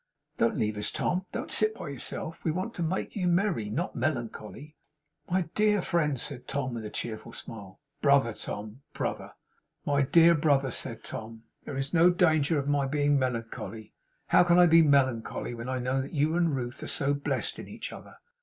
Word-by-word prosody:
'Don't - - +2
leave 105 -1 -1
us, 105 - -1
Tom. 180 +1 -1
Don't - - -4
sit 215 0 +3
by 170 - -7
yourself. 140 +4 -4
We - - 0
want 185 +8 -2
to 175 - -6
make 170 +3 -2
you 185 -4 0
merry; 175 - +1
not 155 - -2
melancholy.' 140 +1 -4 0.5
'My 185 +1 +2
dear 210 -1 +3
friend,' 150 -6 0
said 130 0 -5
Tom, 130 -3 -2
with 115 -2 -5
a - - -4
cheerful 115 +1 -5
smile. 100 -5 -10 0.2
'Brother, 140 -5 +4
Tom. 105 +4 -7
Brother.' - - -4 0.5
'My 140 0 +2
dear 165 +5 +6
brother,' 145 -4 +2
said - - -4
Tom; 110 0 -8 0.2
'there 135 - -5
is 135 +3 -3
no 170 +1 +6
danger 160 -4 +3
of 140 -1 -2
my 145 -1 +1
being 145 0 +2
melancholy, 115 -3 -4 0.4
how - - +6
can 175 0 +4
I 180 - +8
be 165 -1 +7
melancholy, 130 -6 +1
when 120 +1 -6
I 130 - -1
know 130 +2 0
that 135 - -7
you 150 +3 +2
and 170 -4 +2
Ruth 120 -2 -5
are - - -5
so 140 0 0
blest 140 0 -2
in - - -8
each - - -7
other! - - -12
140 Hz, 190 wpm, -28 LUFS, 120-165 Hz, 0.5 s, I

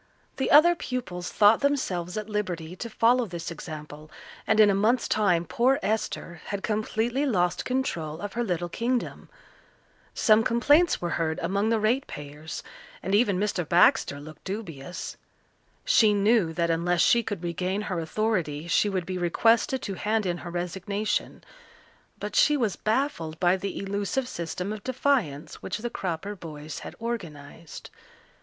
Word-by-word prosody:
The 265 - 0
other 325 +4 +7
pupils 230 - -4
thought 210 +1 +5
themselves 195 -11 -1
at 215 -1 -4
liberty 180 -6 -3
to 230 - -6
follow 235 +2 +3
this 170 -2 -6
example, 155 -2 -8 0.4
and 220 - +3
in 210 -1 +7
a - - +2
month's 220 +5 +2
time 180 -5 +2
poor 245 - +2
Esther 200 -5 -2
had 200 -1 -4
completely 220 +4 -1
lost 180 -8 +1
control 170 - -2
of 205 +1 -5
her 240 - -1
little 175 -5 -1
kingdom. 235 +7 -2 0.9
Some 215 0 +5
complaints 290 - +3
were 175 - -1
heard 160 -1 0
among 200 +5 0
the 225 -1 +2
ratepayers 155 - -3 0.4
and 190 - -2
even 205 -3 +3
Mr. 205 -3 0
Baxter 165 -3 +3
looked 155 +1 -12
dubious. 180 -6 -6 0.7
She 215 -2 +5
knew 205 -3 +3
that 170 0 0
unless 170 +1 +1
she 235 - +5
could 205 -6 -5
regain 180 +4 -2
her 190 -5 -3
authority 165 -4 -1
she 205 +5 +3
would 185 -3 -2
be 185 0 -4
requested 225 +8 +2
to 200 - -3
hand 215 +2 0
in 175 -1 -1
her 175 - -7
resignation, 190 +4 -3 0.8
but - - -5
she 305 -13 +5
was 225 -7 0
baffled 215 - -1
by 180 0 +4
the 195 +1 -4
elusive 200 +6 -2
system 180 0 -4
of 215 - -8
defiance 240 - -1
which 190 - -3
the 240 +2 -5
Cropper 190 +2 -4
boys 155 -4 -8
had - - -9
organized. 165 -9 -7
200 Hz, 155 wpm, -26 LUFS, 170-225 Hz, 0.9 s, other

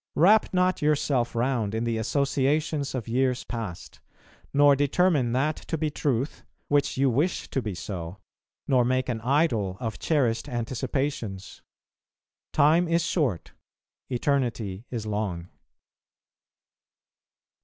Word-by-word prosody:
Wrap 205 +7 +5
not 185 0 +1
yourself 140 -5 +1
round 115 -3 0
in 110 - -1
the 115 -1 -1
associations 140 +4 0
of 120 -3 -4
years 125 +1 +1
past; 110 -8 -7 0.5
nor 145 0 +5
determine 145 -2 +2
that 150 +5 +1
to 165 - -4
be 155 -1 -1
truth 140 -1 -2 0.3
which 145 -2 +1
you 135 +1 +3
wish 145 +9 0
to 135 - 0
be 105 -5 -4
so, 90 -1 -6 0.5
nor 130 -2 +4
make 130 +1 0
an 115 -2 -2
idol 120 - +1
of 115 -3 -4
cherished 130 -8 0
anticipations. 120 -4 -3 0.9
Time 155 +4 +4
is 170 0 +1
short, 130 - -1 0.6
eternity 120 -6 -1
is 115 -3 -4
long. 100 -5 -3
130 Hz, 120 wpm, -26 LUFS, 115-145 Hz, 0.9 s, Wrap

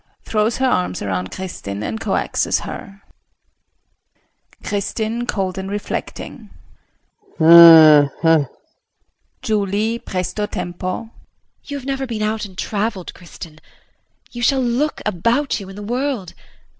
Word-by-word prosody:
[Throws 215 +1 0
her 265 - 0
arms 90 - 0
around 95 -2 -3
Kristin 105 - -6
and 220 - -4
coaxes - - 0
her]. 200 0 -9 1.6
KRISTIN 220 +3 -3
[Cold 190 -3 -2
and 190 0 -5
reflecting]. 205 +1 -6 0.9
Hm 160 -3 +9
hm! 165 -4 +4 1.0
JULIE 215 +2 -1
[Presto 190 +2 -3
tempo]. 180 +5 -5 0.5
You 285 - -5
have 265 - -9
never 270 -1 -3
been 220 -3 -3
out 215 0 -1
and 190 -2 -13
traveled, 205 -3 -3
Kristin. 165 -3 -12 0.7
You 240 - -7
shall 270 +2 +2
look 250 +6 -1
about 230 - 0
you 195 -2 -9
in 195 - -10
the 205 - -8
world. 245 -4 -3
200 Hz, 120 wpm, -19 LUFS, 175-230 Hz, 1.6 s, Hm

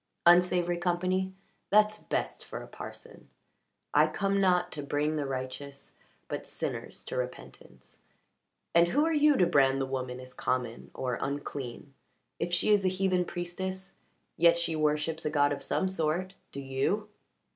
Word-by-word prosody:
"Unsavoury 175 0 +5
company? 185 +2 0 0.4
That's 210 +1 +4
best - - -3
for - - -7
a - - -11
parson. - - -10 0.6
'I - - +6
come 200 0 0
not 180 -2 +3
to 150 - -4
bring 145 +2 0
the 145 -2 -1
righteous 135 +1 -5 0.3
but - - -5
sinners - - -5
to - - -5
repentance.' - - -7 0.7
And 170 0 +6
who 290 - +2
are 325 - +1
you 295 -2 +5
to 180 - +5
brand 135 -5 +4
the 135 - 0
woman 130 -1 -4
as 130 0 -10
common 125 -2 -2
or 125 -2 -2
unclean? 140 -1 -5 0.5
If 175 - -1
she 175 +4 +3
is 205 -2 +5
a - - +3
heathen 185 -1 +1
priestess, 190 +2 -5 0.4
yet 170 0 +6
she 170 -1 -1
worships 155 +1 0
a - - 0
god 145 -1 +3
of 140 - -5
some 190 - 0
sort. 185 +1 -1 0.2
Do 140 - -6
you?" 135 +11 -1
170 Hz, 155 wpm, -30 LUFS, 140-190 Hz, 0.7 s, I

